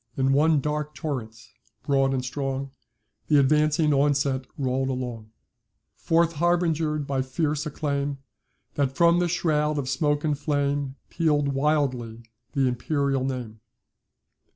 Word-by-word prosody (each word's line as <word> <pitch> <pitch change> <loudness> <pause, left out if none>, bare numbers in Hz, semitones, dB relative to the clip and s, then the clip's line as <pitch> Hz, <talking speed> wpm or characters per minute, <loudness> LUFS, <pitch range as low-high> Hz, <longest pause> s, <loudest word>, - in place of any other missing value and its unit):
In 135 0 +2
one 150 +1 +4
dark 150 +1 -3
torrent, 130 -9 -4 0.5
broad 135 -1 +2
and 130 -1 -1
strong, 135 0 -3 0.6
The 150 - +4
advancing 150 +2 +3
onset 140 -2 +1
roll'd 135 -1 0
along, 125 -4 -4 0.7
Forth 170 -1 +2
harbinger'd 160 -2 +1
by 135 -1 -1
fierce 150 +3 -1
acclaim, 140 -1 -2 0.6
That, 135 -2 -1
from 170 0 +5
the 175 - +2
shroud 155 -3 0
of 140 -3 -2
smoke 145 +3 0
and 150 -2 +1
flame, 145 -1 -1 0.2
Peal'd 150 -4 +1
wildly 135 -5 0 0.3
the 135 -3 +2
imperial 135 +2 0
name. 125 -5 -4
140 Hz, 125 wpm, -25 LUFS, 135-150 Hz, 0.7 s, from